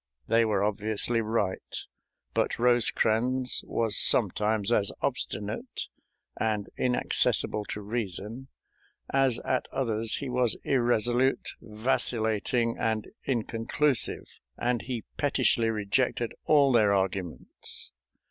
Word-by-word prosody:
They 115 Hz, 0 st, +4 dB
were 105 Hz, -3 st, +1 dB
obviously 105 Hz, +2 st, 0 dB
right, 105 Hz, -4 st, -2 dB, 0.6 s
but -, -, 0 dB
Rosecrans 125 Hz, +1 st, +2 dB
was 115 Hz, -2 st, +1 dB
sometimes 105 Hz, 0 st, +3 dB
as 100 Hz, -4 st, +2 dB
obstinate 105 Hz, +5 st, -3 dB, 0.5 s
and 105 Hz, -2 st, -1 dB
inaccessible 125 Hz, -3 st, +1 dB
to 105 Hz, -, -5 dB
reason 110 Hz, +3 st, -4 dB, 0.7 s
as 135 Hz, -3 st, +3 dB
at 130 Hz, -, 0 dB
others 115 Hz, -4 st, -1 dB
he 140 Hz, -, -4 dB
was 125 Hz, -2 st, +1 dB
irresolute, 120 Hz, 0 st, +1 dB
vacillating, 115 Hz, 0 st, -1 dB
and 110 Hz, -1 st, -1 dB, 0.2 s
inconclusive, 120 Hz, +2 st, 0 dB, 0.3 s
and 120 Hz, -1 st, 0 dB
he 120 Hz, +1 st, -4 dB
pettishly 130 Hz, -5 st, +2 dB
rejected 115 Hz, +3 st, 0 dB
all 145 Hz, -3 st, +5 dB
their 110 Hz, -4 st, +4 dB
arguments. 95 Hz, -3 st, -2 dB
115 Hz, 100 wpm, -28 LUFS, 105-125 Hz, 0.7 s, all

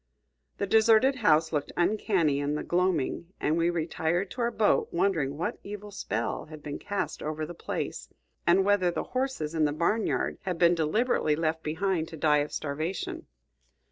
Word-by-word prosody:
The 200 Hz, -, -1 dB
deserted 225 Hz, +5 st, +4 dB
house 160 Hz, -7 st, +3 dB
looked 145 Hz, -2 st, -1 dB
uncanny 175 Hz, -5 st, +2 dB
in 145 Hz, +1 st, -1 dB
the -, -, -3 dB
gloaming, 175 Hz, -3 st, 0 dB
and 155 Hz, -, +1 dB
we 170 Hz, +1 st, +2 dB
retired 170 Hz, +2 st, -1 dB
to 250 Hz, -, -5 dB
our 235 Hz, -, +2 dB
boat 220 Hz, -3 st, +2 dB
wondering 170 Hz, -6 st, 0 dB
what 170 Hz, -, -3 dB
evil 205 Hz, 0 st, -8 dB
spell 115 Hz, -, -3 dB
had 155 Hz, -1 st, -11 dB
been 145 Hz, -1 st, -5 dB
cast 205 Hz, -1 st, -3 dB
over 155 Hz, +1 st, -3 dB
the 175 Hz, -, -8 dB
place, -, -, -5 dB, 0.4 s
and 185 Hz, +3 st, +5 dB
whether 200 Hz, -3 st, +3 dB
the 175 Hz, -, -2 dB
horses 255 Hz, -, -1 dB
in 160 Hz, -2 st, +2 dB
the 145 Hz, -, +1 dB
barn 170 Hz, +9 st, +1 dB
yard -, -, -1 dB
had 180 Hz, -3 st, -3 dB
been 170 Hz, 0 st, +5 dB
deliberately 165 Hz, 0 st, +1 dB
left 160 Hz, 0 st, -1 dB
behind 165 Hz, +1 st, -1 dB
to 160 Hz, -, -9 dB
die 150 Hz, -1 st, +3 dB
of 145 Hz, +1 st, -2 dB
starvation. 185 Hz, -, -4 dB
170 Hz, 175 wpm, -28 LUFS, 155-205 Hz, 0.4 s, and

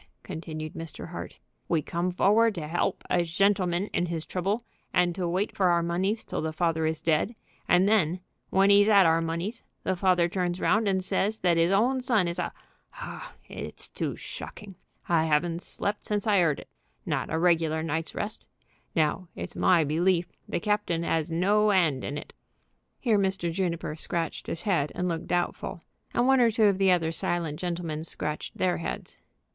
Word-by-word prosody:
continued 155 Hz, -1 st, -6 dB
Mr. 165 Hz, -1 st, -7 dB
Hart, -, -, -7 dB, 0.3 s
"we 160 Hz, -3 st, +2 dB
come 170 Hz, +2 st, -1 dB
forward 210 Hz, +4 st, +3 dB
to 165 Hz, -, -4 dB
'elp 170 Hz, +3 st, -1 dB
a 180 Hz, -, +2 dB
shentleman 185 Hz, +1 st, +1 dB
in 175 Hz, -, +1 dB
his 165 Hz, -2 st, -3 dB
trouble 200 Hz, +6 st, -2 dB, 0.3 s
and 175 Hz, -1 st, +2 dB
to 180 Hz, -1 st, -2 dB
wait 185 Hz, +5 st, -1 dB
for 190 Hz, -, +3 dB
our 170 Hz, -1 st, +3 dB
moneys 190 Hz, +6 st, 0 dB
till -, -, -4 dB
the 160 Hz, 0 st, -2 dB
father 160 Hz, -1 st, 0 dB
is 160 Hz, 0 st, -3 dB
dead, 165 Hz, +8 st, +1 dB, 0.3 s
and 180 Hz, +2 st, +5 dB
then 185 Hz, -5 st, +2 dB, 0.3 s
when 195 Hz, +1 st, +4 dB
'e's 205 Hz, +1 st, +6 dB
'ad 200 Hz, -3 st, +7 dB
our 165 Hz, 0 st, +4 dB
moneys 170 Hz, +8 st, -3 dB, 0.2 s
the 190 Hz, -, 0 dB
father 180 Hz, -2 st, +3 dB
turns 180 Hz, 0 st, -2 dB
round 215 Hz, 0 st, +2 dB
and 190 Hz, -1 st, +1 dB
says 210 Hz, +3 st, 0 dB
that 175 Hz, -2 st, +3 dB
'is 165 Hz, +1 st, +3 dB
own 245 Hz, +7 st, +3 dB
son 225 Hz, -8 st, +2 dB
is 170 Hz, +1 st, -3 dB
a 175 Hz, -, -2 dB, 0.5 s
Oh, -, -, -7 dB, 0.2 s
it's -, -, -7 dB
too -, -, -3 dB
shocking! 205 Hz, -2 st, -8 dB, 0.3 s
I 160 Hz, -2 st, +3 dB
'aven't 165 Hz, +3 st, +1 dB
slept 205 Hz, +2 st, -3 dB
since 205 Hz, -1 st, -1 dB
I 205 Hz, -3 st, +4 dB
'eard 165 Hz, -5 st, +2 dB
it, -, -, -17 dB, 0.4 s
not -, -, -1 dB
a -, -, +1 dB
regular 165 Hz, -2 st, +2 dB
night's 160 Hz, +1 st, -3 dB
rest. 215 Hz, +2 st, -4 dB, 0.5 s
Now, 160 Hz, +3 st, +1 dB
it's -, -, -5 dB
my 170 Hz, -3 st, +4 dB
belief 170 Hz, +4 st, +1 dB, 0.2 s
the -, -, -1 dB
captain 205 Hz, -4 st, 0 dB
'as 165 Hz, -1 st, 0 dB
no 205 Hz, +6 st, +3 dB
'and 165 Hz, -10 st, +2 dB
in 145 Hz, -, -3 dB
it." -, -, -9 dB, 0.7 s
Here 225 Hz, -5 st, +2 dB
Mr. 190 Hz, -3 st, 0 dB
Juniper 170 Hz, -4 st, -2 dB
scratched 165 Hz, +1 st, -2 dB
his 170 Hz, -, -4 dB
head 175 Hz, -9 st, +1 dB
and 180 Hz, -, -1 dB
looked 165 Hz, -2 st, -3 dB
doubtful, 175 Hz, -1 st, -2 dB, 0.3 s
and 240 Hz, -, +3 dB
one 265 Hz, -1 st, +5 dB
or 235 Hz, -, +5 dB
two 225 Hz, 0 st, +1 dB
of 200 Hz, -2 st, +4 dB
the 195 Hz, -1 st, +4 dB
other 170 Hz, -3 st, +3 dB
silent 165 Hz, -2 st, -2 dB
gentlemen 170 Hz, -3 st, -3 dB
scratched 150 Hz, -2 st, -3 dB
their 180 Hz, -1 st, +1 dB
heads. 170 Hz, -, -5 dB
175 Hz, 185 wpm, -27 LUFS, 165-195 Hz, 0.7 s, ad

